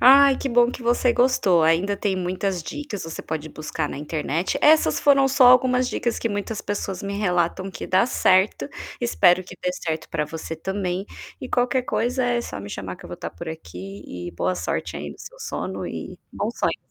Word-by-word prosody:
Ai, 275 +1 +8
que - - -4
bom 240 0 +4
que 250 - -8
você 240 +1 +3
gostou. 220 -10 +3
Ainda 175 +6 +2
tem 200 -1 0
muitas 185 0 -2
dicas, 255 - -6
você 165 0 -6
pode 155 0 -4
buscar 155 0 -4
na - - -6
internet. 155 +3 -2
Essas 310 +1 +5
foram 275 -1 +5
só 265 -1 +5
algumas 250 0 +5
dicas 235 -2 -1
que 230 - -1
muitas 205 +1 -3
pessoas 195 -2 -4
me 200 0 -3
relatam 180 0 0
que - - -7
dá 185 +4 +4
certo. 200 0 +2 0.3
Espero 185 -6 +4
que 180 0 -12
dê 180 - 0
certo 160 -3 -4
pra 150 - 0
você 160 +1 -6
também. 190 +2 -3 0.3
E 255 - -6
qualquer 250 +1 +1
coisa, 250 +1 0
é 240 -1 +1
só 105 - -6
me 100 - -8
chamar 95 -3 -6
que - - -16
eu - - -13
vou - - -5
estar - - -6
por 85 - -8
aqui. 100 - -8 0.3
E - - -6
boa 90 +2 -1
sorte 90 0 -3
aí 75 - -5
no - - -12
seu - - -11
sono - - -4
e - - -7
bom - - -2
sonho. - - -1
190 Hz, 205 wpm, -23 LUFS, 160-245 Hz, 0.3 s, Ai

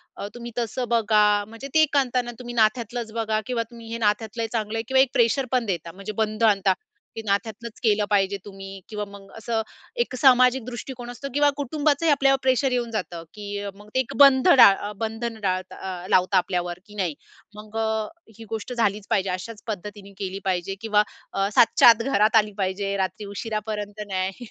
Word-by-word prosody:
अ, - - -5
तुम्ही 240 0 -7
तसं 240 +1 -2
बघा." 210 -2 +3
म्हणजे 230 +5 -9
ते 315 0 +6
आणता 255 -2 +1
ना 240 - -7
तुम्ही 240 -1 -7
नात्यातलंच 225 +1 0
बघा 220 -1 0
किंवा 245 -2 -1
तुम्ही 230 -1 -11
हे 230 - -3
नात्यातल 220 +2 -1
चांगल 220 -1 -2
आहे 225 - -1
किवा 265 0 +3
एक 265 - +3
प्रेशर 240 +3 +2
पण 250 -2 +1
देता, 170 -4 -3
म्हणजे 195 +4 -7
बंध 215 +1 -3
आणता. 195 -1 +1 0.4
ते 225 - -4
नात्यातलच 220 +3 -3
केलं 210 -2 +3
पाहिजे 200 -1 +2
तुम्ही 195 -1 -9
किंवा 210 -1 -4
मग 200 -1 -13
असं 225 0 -1 0.4
एक 280 - -9
सामाजिक 255 -1 +5
दृष्टिकोन 245 0 -7
असतो 250 +3 -6
किंवा 290 +1 +4
कुटुंबाचंही 295 +3 +1
आपल्यावर 270 -1 +4
प्रेशर 260 +1 +2
येऊन 240 -2 -1
जातं, 180 -6 -4
की 205 -1 -5
मग 205 +1 -15
ते 260 - +3 0.2
बंध 275 +2 +7
डाळ 205 -3 +6
बंधन 225 +1 -3
डाळता 185 -2 -2 0.3
अ, - - -8
लावता 185 +1 +3
आपल्यावर 180 -1 -1
की 210 -1 -15
नाही 185 -6 -1 0.4
मग 215 +1 -9
अ, 220 -1 0 0.3
ही 225 - -10
गोष्ट 225 +2 -4
झालीच 210 -4 0
पाहिजे. 195 -4 +1
अशाच 195 +4 -5
पद्धतीने 205 -1 -7
केली 195 -1 -4
पाहिजे 190 0 -1
किंवा 210 -2 +3 0.3
अ, 195 0 +1
7:00 230 - +7
च्या - - +9
आत 230 0 +5
घरात 215 -3 +3
आली 210 -1 +4
पाहिजे. 195 +1 -1
रात्री 190 +3 -2
उशिरापर्यंत 215 -1 -4
नाही. 190 +4 -3
215 Hz, 185 wpm, -24 LUFS, 200-240 Hz, 0.4 s, च्या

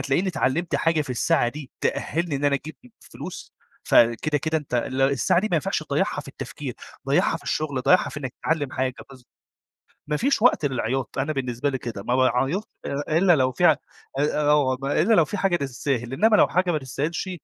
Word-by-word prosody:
هتلاقيني 135 +8 0
اتعلّمت 170 +1 -1
حاجة 165 -1 +1
في 140 - -8
الساعة 120 0 +2
دي 140 +1 -8
تأهِّلني 165 -2 -1
إن 140 - -4
أنا 145 -1 +3
أجيب 155 +3 -5
م - - -15
فلوس - - -9 0.3
فكده، 120 +6 +3
كده 160 +2 0
أنت 145 -4 -7
ال 130 +2 -1
الساعة 140 +6 +2
دي 215 - -1
ما - - +1
ينفعش 150 - -1
تضيّعها - - -1
في - - -12
التفكير، - - -7 0.3
ضيّعها - - +2
في - - -14
الشغل، 145 -4 -2
ضيّعها 140 +8 +4
في 150 - -7
إنّك 130 -3 -5
تتعلّم 145 -4 -1
حاجة 130 -1 -1 0.2
بالض 130 -2 -14 0.9
ما 150 0 0
فيش 275 -1 +1
وقت 235 -10 +4
للعياط، 130 -2 -2
أنا 140 +4 -1
بالنسبة 130 0 -2
لي 135 - -2
كده، 115 -5 -6
ما 120 +3 0
باعيّطش 135 +8 +1 0.2
أ 145 +3 -1
إلّا 175 -1 +5
لو 130 -3 +2
في 175 +7 +1
أ - - +8 0.5
أ 150 +1 +1
أو 140 -3 +3
إلّا 155 +10 +2
لو 170 -7 +5
في 205 - -4
حاجة 190 -2 +1
تستاهل، 130 -4 -2
إنّما 215 +9 +4
لو - - +5
حاجة 185 0 +1
ما 160 - +1
تستاهلش 150 +8 -3
145 Hz, 205 wpm, -24 LUFS, 130-165 Hz, 0.9 s, أ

